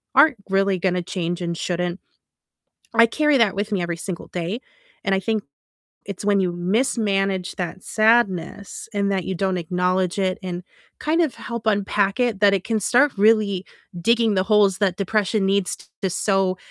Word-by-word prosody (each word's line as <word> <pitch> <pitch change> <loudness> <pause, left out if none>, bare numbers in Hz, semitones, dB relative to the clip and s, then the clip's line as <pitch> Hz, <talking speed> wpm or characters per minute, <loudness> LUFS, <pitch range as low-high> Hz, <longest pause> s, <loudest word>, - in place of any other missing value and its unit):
aren't 300 -7 +6
really 195 -1 +2
gonna 180 0 0
change 175 0 -3
and 170 -1 -2
shouldn't, 175 +1 -2 1.0
I 230 0 +7
carry 300 +4 +2
that 220 -5 +3
with 205 +2 -3
me 190 -3 0
every 170 -1 -3
single 175 0 -6
day, 180 +7 -4 0.4
and 195 - +2
I 190 - +1
think 215 +2 -1 0.6
it's 200 0 -7
when 205 -1 +3
you 180 -2 0
mismanage 195 -1 0
that 180 +1 -5
sadness, 215 -4 +1
and 200 -1 0
that 190 -2 -1
you 190 - -3
don't 190 +1 -1
acknowledge 180 +2 0
it, 185 -1 0
and 180 -1 -5 0.4
kind 315 +3 +1
of 310 -6 -1
help 235 -2 -7
unpack 205 +1 +1
it, 235 -5 0
that 200 -1 +5
it 190 -1 -1
can 225 -1 0
start 255 +7 +3
really 205 -2 +3 0.4
digging 230 +2 +2
the 185 - +1
holes 205 -3 +3
that 195 -4 +1
depression 205 0 0
needs 195 -2 +1 0.3
to 190 - 0
sow 190 0 +1
195 Hz, 170 wpm, -22 LUFS, 185-215 Hz, 1.0 s, I